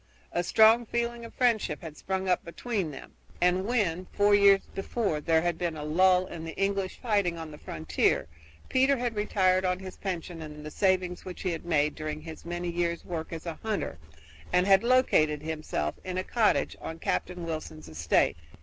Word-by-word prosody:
A 175 Hz, -, 0 dB
strong 220 Hz, +5 st, +5 dB
feeling 235 Hz, 0 st, -2 dB
of 230 Hz, -, -12 dB
friendship 220 Hz, -11 st, +1 dB
had 160 Hz, -3 st, -7 dB
sprung 190 Hz, +3 st, -3 dB
up 180 Hz, -, +2 dB
between 195 Hz, +1 st, -3 dB
them, 140 Hz, -, -10 dB, 0.3 s
and 180 Hz, +2 st, +2 dB
when, 185 Hz, -7 st, 0 dB
four 205 Hz, 0 st, +4 dB
years 200 Hz, -1 st, +6 dB
before, 195 Hz, -5 st, -1 dB
there 160 Hz, +1 st, +2 dB
had 175 Hz, -2 st, -1 dB
been 170 Hz, -3 st, -2 dB
a 150 Hz, -, -5 dB
lull 180 Hz, +4 st, +4 dB
in 170 Hz, -3 st, -8 dB
the 165 Hz, -1 st, -6 dB
English 195 Hz, -1 st, -1 dB
fighting 200 Hz, -8 st, +1 dB
on 160 Hz, -1 st, -7 dB
the 150 Hz, -, -11 dB
frontier, 80 Hz, 0 st, 0 dB, 0.4 s
Peter 265 Hz, +1 st, +3 dB
had 240 Hz, -2 st, -2 dB
retired 190 Hz, -3 st, +2 dB
on 180 Hz, -1 st, +1 dB
his 185 Hz, 0 st, -9 dB
pension 175 Hz, -3 st, -4 dB
and 150 Hz, -1 st, -8 dB
the 150 Hz, -, -6 dB
savings 185 Hz, -1 st, +1 dB
which 185 Hz, -1 st, -8 dB
he 185 Hz, -, 0 dB
had 165 Hz, -1 st, -5 dB
made 150 Hz, -3 st, +2 dB
during 155 Hz, 0 st, -5 dB
his 160 Hz, +1 st, -10 dB
many 175 Hz, 0 st, -3 dB
years' 170 Hz, 0 st, -1 dB
work 165 Hz, -2 st, -5 dB
as 165 Hz, 0 st, -6 dB
a 165 Hz, -2 st, -5 dB
hunter, 215 Hz, -, -3 dB, 0.5 s
and 180 Hz, +1 st, +3 dB
had 195 Hz, -1 st, +6 dB
located 155 Hz, -, +3 dB
himself 155 Hz, -, -2 dB
in 185 Hz, 0 st, -4 dB
a 185 Hz, -, 0 dB
cottage 220 Hz, +1 st, +1 dB
on 160 Hz, -, -6 dB
Captain 175 Hz, +1 st, -2 dB
Wilson's 155 Hz, -, -6 dB
estate. 80 Hz, -1 st, +1 dB
180 Hz, 190 wpm, -28 LUFS, 160-200 Hz, 0.5 s, years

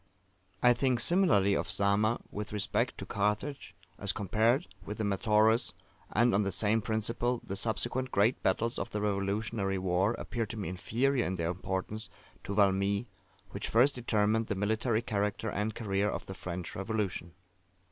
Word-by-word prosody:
I 125 Hz, 0 st, +7 dB
think 125 Hz, 0 st, +1 dB
similarly 115 Hz, -, +4 dB
of -, -, -1 dB
Zama 100 Hz, +3 st, +2 dB
with 105 Hz, +1 st, -5 dB
respect 105 Hz, -2 st, -1 dB
to -, -, -6 dB
Carthage, 105 Hz, +8 st, -2 dB, 0.2 s
as 100 Hz, -1 st, -1 dB
compared 110 Hz, -, +1 dB, 0.2 s
with 105 Hz, -, -6 dB
the 110 Hz, -, -2 dB
Metaurus: 110 Hz, +3 st, +3 dB, 0.4 s
and, 120 Hz, +1 st, +3 dB
on 100 Hz, -, +3 dB
the 100 Hz, -1 st, -1 dB
same 105 Hz, +4 st, +3 dB
principle, 115 Hz, +2 st, 0 dB
the 95 Hz, -, -4 dB
subsequent 120 Hz, +5 st, 0 dB
great 110 Hz, +2 st, +2 dB
battles 115 Hz, +5 st, +1 dB
of -, -, -3 dB
the 105 Hz, -, -3 dB
Revolutionary 100 Hz, 0 st, -1 dB
war 95 Hz, +4 st, +1 dB
appear 115 Hz, -1 st, -3 dB
to 110 Hz, -, -7 dB
me 100 Hz, -6 st, -3 dB
inferior 120 Hz, +8 st, 0 dB
in 95 Hz, -, -2 dB
their 85 Hz, -1 st, -1 dB
importance 95 Hz, +3 st, -4 dB, 0.4 s
to 100 Hz, -, -3 dB
Valmy, 100 Hz, +1 st, +2 dB, 0.5 s
which -, -, -5 dB
first 125 Hz, +5 st, +4 dB
determined 110 Hz, -2 st, +1 dB
the 105 Hz, -, -1 dB
military 110 Hz, +3 st, 0 dB
character 105 Hz, -1 st, -1 dB
and 105 Hz, +2 st, -2 dB
career 100 Hz, -2 st, 0 dB
of -, -, -4 dB
the 95 Hz, -, -7 dB
French 90 Hz, -2 st, -6 dB
Revolution. 100 Hz, -4 st, -3 dB
105 Hz, 160 wpm, -31 LUFS, 100-115 Hz, 0.5 s, I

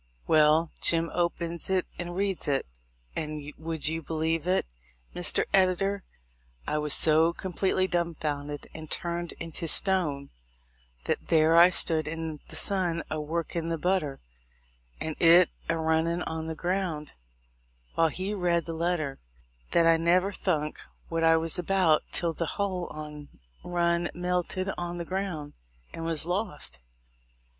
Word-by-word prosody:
Well, 155 Hz, +1 st, +4 dB
Jim 165 Hz, 0 st, +3 dB
opens 170 Hz, -1 st, -1 dB
it 190 Hz, -1 st, +1 dB
and 175 Hz, 0 st, -5 dB
reads 195 Hz, -1 st, -1 dB
it; 140 Hz, -2 st, 0 dB, 0.5 s
and 150 Hz, -1 st, -4 dB
would 160 Hz, -2 st, 0 dB
you 160 Hz, +1 st, -1 dB
believe 160 Hz, +1 st, -2 dB
it, 185 Hz, +1 st, +2 dB, 0.5 s
Mr. -, -, +2 dB
Editor, 195 Hz, +1 st, +2 dB, 0.6 s
I 150 Hz, -, -1 dB
was 150 Hz, -1 st, +5 dB
so 160 Hz, +2 st, +6 dB
com 185 Hz, +1 st, -6 dB
pletely 185 Hz, +1 st, +1 dB
dum 170 Hz, -2 st, -1 dB
founded 145 Hz, -1 st, -4 dB
and 155 Hz, -1 st, -9 dB
turned 170 Hz, 0 st, -2 dB
into 165 Hz, 0 st, -3 dB
stone 155 Hz, -7 st, +2 dB, 0.7 s
that -, -, -2 dB
there 160 Hz, 0 st, +4 dB
I 170 Hz, +2 st, +8 dB
stood 160 Hz, -3 st, +3 dB
in 160 Hz, -1 st, -5 dB
the -, -, -6 dB
sun 175 Hz, -4 st, +1 dB
a 155 Hz, -, -2 dB
workin' 165 Hz, +1 st, -3 dB
the 165 Hz, -, -1 dB
butter, 170 Hz, -5 st, -1 dB, 0.8 s
and 160 Hz, -1 st, -4 dB
it 170 Hz, +1 st, +6 dB, 0.2 s
a 165 Hz, -, +1 dB
running 160 Hz, +2 st, 0 dB
on 160 Hz, 0 st, -4 dB
the 160 Hz, -, -4 dB
ground, 175 Hz, -3 st, -2 dB, 0.8 s
while 165 Hz, -, +3 dB
he 185 Hz, +6 st, -3 dB
read 175 Hz, -4 st, 0 dB
the 165 Hz, -, -5 dB
letter, 160 Hz, -4 st, -2 dB, 0.5 s
that 170 Hz, -, +3 dB
I 165 Hz, 0 st, +5 dB
never 180 Hz, +4 st, +2 dB
thunk 155 Hz, -6 st, -2 dB, 0.3 s
what 165 Hz, 0 st, -1 dB
I 165 Hz, 0 st, +5 dB
was 165 Hz, +1 st, +1 dB
about 180 Hz, -4 st, +3 dB
till 170 Hz, -1 st, 0 dB
the 165 Hz, 0 st, -3 dB
hull 190 Hz, -4 st, -2 dB
on't 150 Hz, -1 st, -8 dB, 0.3 s
run 170 Hz, -1 st, 0 dB
melted 180 Hz, +1 st, -2 dB
on 175 Hz, 0 st, -4 dB
the 170 Hz, -, -4 dB
ground 180 Hz, -6 st, -4 dB, 0.4 s
and 165 Hz, -, -6 dB
was 160 Hz, -1 st, +1 dB
lost. 180 Hz, -, -2 dB
165 Hz, 150 wpm, -27 LUFS, 155-180 Hz, 0.8 s, I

